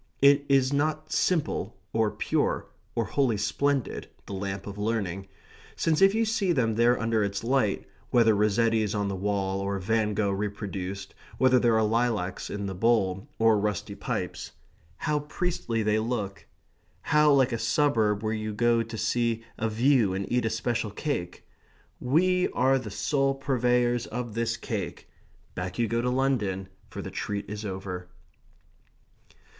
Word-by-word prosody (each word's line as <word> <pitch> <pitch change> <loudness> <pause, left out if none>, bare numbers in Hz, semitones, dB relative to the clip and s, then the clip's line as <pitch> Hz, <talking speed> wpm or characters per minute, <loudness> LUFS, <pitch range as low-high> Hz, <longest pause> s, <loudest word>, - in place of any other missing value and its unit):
It 140 +1 +5
is 135 0 +3
not 155 +2 -1
simple, 150 - 0 0.2
or 110 -1 +2
pure, - - -1 0.3
or 115 - +1
wholly 120 0 +1
splendid, 135 +6 -1 0.2
the - - -7
lamp 95 0 -4
of 100 0 -7
learning, 100 -3 -2 0.5
since 160 0 +1
if 195 +1 +6
you 225 0 +2
see 215 -4 +1
them 115 -6 +1
there 120 +2 +3
under 115 -2 +1
its 100 +1 -2
light 120 -4 +1 0.2
(whether 115 -2 +5
Rossetti's 105 +1 +2
on 100 -1 0
the 100 - -2
wall, 95 0 -1
or 100 0 -2
Van 105 +2 0
Gogh 100 -1 +1
reproduced, 100 -1 -4 0.2
whether 130 -1 +5
there 120 -2 +3
are 110 - +3
lilacs 110 -5 0
in 100 0 -4
the 95 - -3
bowl 95 -2 +1
or 110 -2 +4
rusty 105 -2 -2
pipes), - - -4 0.4
how 150 -1 0
priestly 150 -6 -2
they 105 +1 +2
look! 105 -4 -3 0.6
How 150 0 +4
like 135 -2 +4
a 115 - -2
suburb 115 -4 +2
where 110 0 0
you 110 -1 -3
go 120 +1 +3
to 115 0 -6
see 115 0 0 0.2
a 110 - 0
view 115 -3 +3
and 100 +1 -2
eat 120 -1 +2
a - - +2
special 115 0 -1
cake! 105 - -4 0.5
"We 180 +8 +2
are 135 +1 +3
the 120 -4 -7
sole 135 +6 0
purveyors 125 -3 +1
of 120 -1 -5
this 115 0 -1
cake." - - -5 0.4
Back 90 0 -5
you 120 -1 +1
go 115 +2 0
to 125 - 0
London; 115 -8 0 0.2
for - - -6
the - - -6
treat 100 0 -3
is 105 +1 -6
over. 95 -2 -5
115 Hz, 160 wpm, -27 LUFS, 100-130 Hz, 0.6 s, if